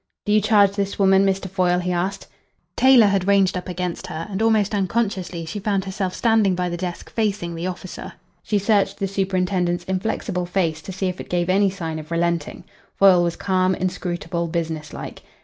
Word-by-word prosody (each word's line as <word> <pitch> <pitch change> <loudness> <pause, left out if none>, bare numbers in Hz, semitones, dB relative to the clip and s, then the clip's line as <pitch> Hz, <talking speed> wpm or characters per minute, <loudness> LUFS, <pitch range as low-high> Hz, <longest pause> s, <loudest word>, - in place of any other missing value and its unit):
"Do 210 - 0
you 215 0 +4
charge 205 -2 +4
this 200 0 -3
woman, 195 -1 +4
Mr. 195 0 -1
Foyle?" 180 -1 +1
he 180 0 -2
asked. 180 +3 -2 0.5
Taylor 260 -4 +6
had 195 -2 +1
ranged 195 -2 +3
up 180 +1 -5
against 180 -1 -4
her, 165 -2 -5
and 195 +2 -3
almost 220 -2 +2
unconsciously 190 -4 -1
she 185 +6 -5
found 200 -2 -1
herself 190 -1 -3
standing 220 -5 +3
by 180 0 -1
the 175 - -3
desk 175 0 -6
facing 205 -6 -1
the 165 +2 -4
officer. 185 0 -7 0.3
She 210 - 0
searched 200 -1 +1
the 195 - -1
superintendent's 185 -2 0
inflexible 185 -1 -2
face 170 -4 -1
to 190 - -8
see 190 +1 -3
if 180 -1 -3
it - - -11
gave 175 0 0
any 200 +1 +3
sign 165 -4 -5
of 155 0 -10
relenting. 170 -2 -1 0.3
Foyle 190 -3 +6
was 170 -1 0
calm, 185 -1 +1
inscrutable, 175 -1 -3
business 160 -2 -3
like. - - -8
185 Hz, 190 wpm, -22 LUFS, 175-200 Hz, 0.5 s, Taylor